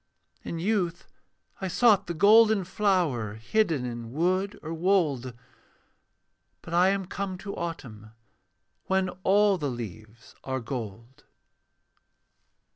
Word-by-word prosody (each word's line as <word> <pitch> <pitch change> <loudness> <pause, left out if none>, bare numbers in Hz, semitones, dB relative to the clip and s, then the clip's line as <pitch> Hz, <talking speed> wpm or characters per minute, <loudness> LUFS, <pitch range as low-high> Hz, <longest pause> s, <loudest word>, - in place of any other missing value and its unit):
In 170 - -5
youth 180 -2 -1 0.6
I 190 - -1
sought 210 +2 +3
the 170 - -4
golden 215 +2 +6
flower 175 - 0
Hidden 155 - 0
in 120 -1 -6
wood 185 +7 0
or 160 +1 -5
wold, 160 -9 0 1.3
But 165 - -8
I 180 +2 +5
am 195 -1 -1
come 195 0 -4
to 200 +2 -7
autumn, 120 -11 -6 0.8
When 190 -1 +1
all 200 0 +4
the 145 -3 -1
leaves 110 -2 -9
are 130 0 -2
gold. 115 0 -7
170 Hz, 115 wpm, -27 LUFS, 125-195 Hz, 1.3 s, golden